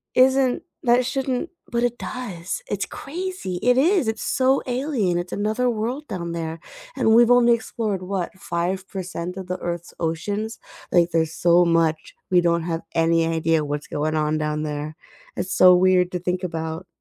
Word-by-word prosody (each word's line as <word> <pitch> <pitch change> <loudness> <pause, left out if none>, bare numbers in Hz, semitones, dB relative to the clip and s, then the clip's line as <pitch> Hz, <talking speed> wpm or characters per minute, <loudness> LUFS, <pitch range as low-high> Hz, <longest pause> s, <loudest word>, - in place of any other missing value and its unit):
isn't 260 0 +4 0.2
that 245 0 +4
shouldn't 265 +3 -2 0.2
but 235 0 0
it 240 0 0
does, 205 - -5
it's - - -1
crazy, 330 - -5
it 250 +1 +3
is, 335 - +3
it's 220 0 -2
so 265 +1 +2
alien, 245 - 0
it's 175 0 -5
another 220 +5 0
world 240 +5 -2
down 175 -6 -4
there, 165 -1 -4 0.4
and 220 - +3
we've 240 +1 +6
only 245 -1 +6
explored, 220 -4 -2
what, 185 -1 -3
5% 180 0 -4
of 190 - -5
the 185 0 -3
Earth's 175 -1 -5
oceans? 205 +7 -2 0.3
Like, 175 -1 +3
there's 160 -1 +1
so 175 +1 +4
much, 165 -2 +1 0.2
we 180 -1 +5
don't 170 -1 +1
have 165 -1 -2
any 165 0 +3
idea 165 -1 +1
what's 145 +1 -3
going 155 +1 -1
on 155 0 0
down 150 0 -1
there. 150 0 -4 0.4
It's 190 - -2
so 180 -1 +7
weird 180 0 +3
to 180 - -1
think 180 +1 -2
about. 160 0 -4
180 Hz, 170 wpm, -23 LUFS, 165-240 Hz, 0.4 s, so